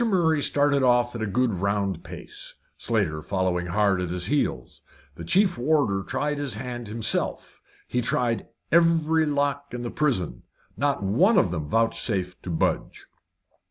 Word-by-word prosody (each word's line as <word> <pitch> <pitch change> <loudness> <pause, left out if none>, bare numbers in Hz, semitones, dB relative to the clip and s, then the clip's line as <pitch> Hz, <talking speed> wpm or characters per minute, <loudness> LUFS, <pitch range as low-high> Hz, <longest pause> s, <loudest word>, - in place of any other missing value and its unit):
Murray 170 -9 +2
started 145 0 +2
off 120 -1 +3
at 115 - -5
a 110 - -1
good 120 +3 +1
round 100 -3 -1
pace, - - -9 0.2
Slater 100 -10 -1
following 90 0 -1
hard 100 0 +2
at 90 - -3
his 90 0 -3
heels. 105 - -2 0.3
The 85 - -9
chief 185 - +2
warder 125 -8 +2
tried 145 +7 -2
his 140 -6 -3
hand 120 0 -5
himself. 110 0 -2 0.3
He 125 - 0
tried 120 -1 0 0.2
every 160 -1 +3
lock 145 -2 -1
in 120 - -5
the 120 - -4
prison; 95 - -1 0.3
not 140 -2 0
one 180 - +3
of 90 - +3
them 80 -4 -3
vouchsafed 95 -2 -1
to - - -7
budge. 80 - -1
120 Hz, 155 wpm, -25 LUFS, 95-145 Hz, 0.3 s, off